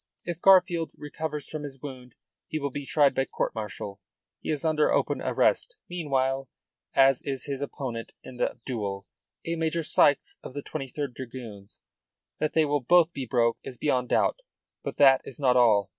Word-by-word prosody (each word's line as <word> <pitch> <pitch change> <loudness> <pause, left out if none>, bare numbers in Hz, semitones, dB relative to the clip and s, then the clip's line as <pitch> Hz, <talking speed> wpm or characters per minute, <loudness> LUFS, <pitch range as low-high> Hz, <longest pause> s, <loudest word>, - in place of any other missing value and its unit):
If 175 -1 -4
Garfield 180 -4 +5
recovers 150 0 -5
from 155 - -5
his 140 -2 -7
wound 125 -3 -9 0.3
he 155 - -3
will 140 -2 -2
be 140 +1 -6
tried 145 -3 +4
by 135 - +1
court - - -2
martial. 105 -2 -6 0.4
He - - -7
is 150 0 -1
under 155 -1 +3
open - - +1
arrest - - +1
meanwhile, 135 -6 -1 0.5
as 135 -1 +5
is 135 -2 -4
his 140 -1 -4
opponent 130 -5 -5
in 130 - -10
the - - -1
duel 100 -6 -3 0.4
a 165 - -1
Major 165 0 0
Sykes 145 -1 +3
of 130 - -9
the 145 - -4
23rd 140 -2 -4
Dragoons. 115 -6 -9 0.6
That 155 - 0
they 160 -1 +4
will 145 -1 0
both 170 +5 +4
be 135 -2 -5
broke 115 -1 +2
is 130 -2 -8
beyond 125 -3 0
doubt. - - +2 0.5
But - - -5
that 135 -2 +7
is 135 - -10
not 130 -3 +3
all. 110 -5 +4
135 Hz, 175 wpm, -27 LUFS, 125-155 Hz, 0.6 s, that